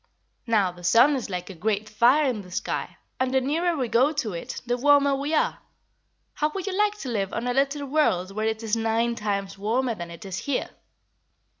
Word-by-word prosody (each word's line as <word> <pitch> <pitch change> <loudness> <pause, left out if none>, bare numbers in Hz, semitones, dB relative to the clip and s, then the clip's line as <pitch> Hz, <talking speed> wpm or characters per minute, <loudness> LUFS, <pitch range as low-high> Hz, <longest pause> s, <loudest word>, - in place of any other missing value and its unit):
Now, 210 -5 +2
the 175 0 -15
sun 235 +11 +5
is 250 -5 -4
like 180 0 -4
a - - -8
great 210 +4 -1
fire 240 +8 +4
in 235 -5 -1
the 180 - -13
sky, 180 - -3 0.2
and 260 0 +1
the 265 - +3
nearer 325 +6 0
we 255 -3 -1
go 250 +6 +3
to 280 -10 -2
it 170 - -5
the 245 0 0
warmer 285 +2 +4
we 285 +3 -1
are. - - +1 0.7
How 300 - 0
would 385 -2 -3
you 390 -2 -3
like 420 +1 +2
to 260 - -5
live 200 -5 -1
on 230 - -3
a 245 - 0
little 280 +2 0
world 235 - +1
where 215 +2 -2
it 220 0 -2
is 220 0 0
nine 225 +1 +1
times 200 -3 -3
warmer 235 +4 0
than 175 -5 -7
it 170 +5 -10
is 190 -1 -4
here?" 285 -3 -2
235 Hz, 215 wpm, -25 LUFS, 205-280 Hz, 0.7 s, sun